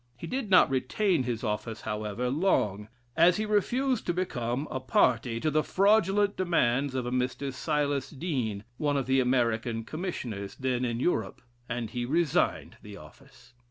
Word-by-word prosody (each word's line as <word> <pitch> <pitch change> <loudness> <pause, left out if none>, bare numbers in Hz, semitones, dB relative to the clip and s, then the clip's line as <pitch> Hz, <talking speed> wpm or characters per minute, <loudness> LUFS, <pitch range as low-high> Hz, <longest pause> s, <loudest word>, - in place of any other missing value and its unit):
He - - -7
did 255 -4 -3
not 185 -7 +6
retain 150 +8 +1
his 120 -2 -3
office, 110 0 -3
however, 105 +3 -3
long, 105 - +1 0.3
as 170 +2 +5
he 215 - -1
refused 240 +4 0
to 175 - 0
become 130 -6 -2
a 130 - -2
party 120 -2 +2
to 155 +5 0
the 155 +1 +3
fraudulent 200 0 +3
demands 140 -7 +1
of 130 -2 -1
a 120 - -3
Mr. 130 +2 -2
Silas 145 -1 -1
Deane, 130 - -3 0.2
one 145 -2 +1
of 135 - -1
the 130 0 +2
American 120 -2 +1
Commissioners, 120 - -5
then 130 -1 -1
in 120 -1 -2
Europe; 110 - -1 0.3
and 115 -2 -3
he 120 -1 -3
resigned 155 +4 0
the 105 -1 -10
office. 130 -1 -17
130 Hz, 160 wpm, -28 LUFS, 120-170 Hz, 0.3 s, not